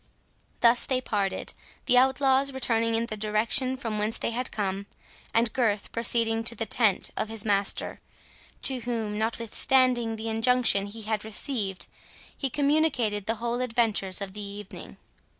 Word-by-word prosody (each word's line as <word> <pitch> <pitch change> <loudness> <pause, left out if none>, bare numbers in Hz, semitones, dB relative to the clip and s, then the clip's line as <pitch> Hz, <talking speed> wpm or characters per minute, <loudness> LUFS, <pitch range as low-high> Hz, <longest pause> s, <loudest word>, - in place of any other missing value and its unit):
Thus 235 +1 +5
they 260 -1 +1
parted, 205 -6 -2 0.3
the 250 - +3
outlaws 265 +1 +2
returning 230 -3 0
in 230 +1 0
the 220 - -5
direction 215 +5 +1
from 225 -5 -4
whence 215 +2 -1
they - - -2
had 245 +2 -3
come, 200 -1 -3 0.4
and 230 -1 +1
Gurth 215 -5 0
proceeding 230 -1 +2
to 235 - +1
the 225 - -3
tent 215 -3 +2
of 215 - -3
his 225 -1 -2
master, 200 -1 0 0.6
to 265 -2 -1
whom, 225 -3 -3
notwithstanding 235 +1 +2
the 220 +1 -6
injunction 225 -2 +3
he 220 +2 -8
had 215 0 -2
received, 215 -3 -2 0.5
he 270 - -2
communicated 280 -8 0
the 225 - 0
whole 235 +2 -3
adventures 225 -6 0
of 195 -1 -5
the 210 - -6
evening. 200 0 -9
225 Hz, 150 wpm, -27 LUFS, 210-250 Hz, 0.6 s, Thus